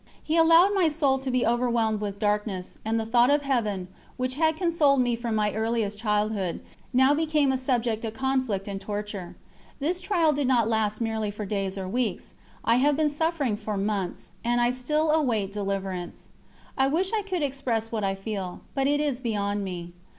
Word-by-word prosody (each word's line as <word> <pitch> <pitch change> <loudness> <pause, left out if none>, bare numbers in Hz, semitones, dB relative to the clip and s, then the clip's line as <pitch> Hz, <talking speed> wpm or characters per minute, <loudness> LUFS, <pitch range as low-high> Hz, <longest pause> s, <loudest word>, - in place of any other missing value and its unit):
He 315 - -1
allowed 335 +4 +6
my 370 -5 +3
soul 285 -3 +1
to 265 0 -4
be 255 -1 +1
overwhelmed 235 -3 +1
with 200 -1 -3
darkness, 205 -3 -1
and 225 +1 0
the 220 - -2
thought 240 +2 +4
of 290 0 +3
Heaven, 215 -9 -1 0.3
which 255 0 -1
had 315 +2 +1
consoled 320 -6 +3
me 245 -1 +2
from 230 -1 -3
my 210 -1 +1
earliest 220 -2 -1
childhood, 210 -4 0 0.3
now 265 +2 +5
became 300 -2 +2
a - - +1
subject 240 -4 0
of 225 -1 -4
conflict 260 -7 -1
and 195 -1 -4
torture. 205 -3 -5 0.4
This 345 +6 -1
trial 340 -6 +2
did 285 -2 0
not 240 -4 +3
last 220 -1 0
merely 220 -2 -1
for 210 +1 -5
days 195 -1 -2
or 190 -1 -4
weeks; 225 -1 -2 0.3
I 230 +1 +4
have 285 +2 +3
been 310 -1 +3
suffering 295 -6 0
for 210 -1 -4
months, 195 -2 -2
and 240 +1 +1
I 240 0 +3
still 300 +5 0
await 235 -11 +1
deliverance. 195 -3 -4 0.5
I 265 - +3
wish 360 +8 0
I 435 - +2
could 375 -5 -2
express 255 -5 -1
what 220 -2 -2
I 195 0 0
feel, 195 -2 -5
but 270 -1 +1
it 290 +1 +2
is 285 -4 -1
beyond 205 -3 -1
me. 175 -2 -6
235 Hz, 190 wpm, -26 LUFS, 210-280 Hz, 0.5 s, allowed